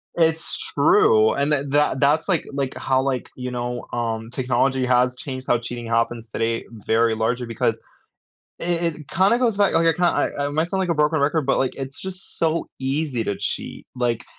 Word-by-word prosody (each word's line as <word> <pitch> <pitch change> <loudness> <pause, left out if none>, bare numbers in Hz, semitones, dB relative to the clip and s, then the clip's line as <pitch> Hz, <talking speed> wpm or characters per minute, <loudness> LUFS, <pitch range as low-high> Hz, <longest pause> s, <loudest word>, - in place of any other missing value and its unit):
It's 165 -1 +2 0.2
true, 110 0 +5
and 140 +2 0
tha 140 -2 +2
that 145 -2 +2
that's 155 +6 +2
like 170 -5 +1
like 135 -1 -2
how, 130 0 +1
like, 130 -2 -2
you 125 0 -5
know, 120 0 -4
um, 115 -1 -2
technology 130 +1 0
has 125 0 +2
changed 130 -1 -6
how 120 - +3
cheating 120 0 -6
happens 115 0 -1
today 115 +1 -2 0.2
very 115 0 +2
largely 115 +2 -1
because 115 - -1 0.8
it 170 -1 -1
it 150 -3 -13
kinda 190 +9 +3
goes 235 -5 +1
back 200 -1 +3
okay, 165 0 +3
ki 180 - -3
I 175 - +2 0.2
I - - -1
might 155 +2 +1
sound 190 +1 -1
like 185 -2 -1
a - - +2
broken 150 0 +2
record, 145 0 +1
but, 135 - +2
like, 130 - 0
it's 135 0 -6
just 185 -1 -3
so 165 0 0
easy 135 -2 -1
to 100 - -1
cheat, - - -4
like, 120 -2 -1
135 Hz, 195 wpm, -22 LUFS, 120-160 Hz, 0.8 s, true